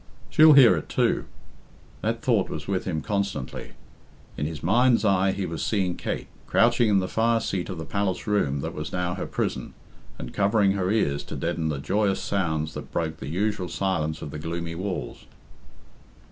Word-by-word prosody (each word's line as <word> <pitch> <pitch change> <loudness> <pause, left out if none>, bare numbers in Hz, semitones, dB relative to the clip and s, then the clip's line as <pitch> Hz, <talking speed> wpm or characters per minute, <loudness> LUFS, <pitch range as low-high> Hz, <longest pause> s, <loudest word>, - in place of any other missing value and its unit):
"She'll 155 0 +8
hear 130 -9 +8
it, 75 - -6
too." - - +1 0.8
That - - -2
thought - - +2
was 75 -1 -6
with 95 -2 -1
him 80 -4 -2
constantly. 100 - -3 0.6
In 75 - -2
his 80 -2 -7
mind's 120 +5 +3
eye 95 -1 +3
he 95 0 -3
was 80 -2 -4
seeing 95 -5 0
Kate, - - -4 0.2
crouching 120 0 +3
in 100 - +4
the 95 -1 +1
fire 115 +2 +2
seat 95 -5 -3
of 90 - -5
the 80 - -5
palace 100 -2 -2
room 75 -10 +1
that - - -4
was 75 - -5
now 90 -1 -1
her 95 - -4
prison, - - -3 0.4
and 60 - -7
covering 100 0 +3
her 95 -2 -1
ears 75 -10 +1
to - - -7
deaden 85 -1 -1
the 75 - -2
joyous 100 +7 0
sounds 80 -5 -1
that - - -8
broke 80 -1 -2
the 70 - -7
usual 95 +1 -1
silence 80 -5 -1
of 75 - -6
the 75 - -6
gloomy 85 +1 -4
walls. 90 -7 -5
95 Hz, 185 wpm, -25 LUFS, 80-100 Hz, 0.8 s, She'll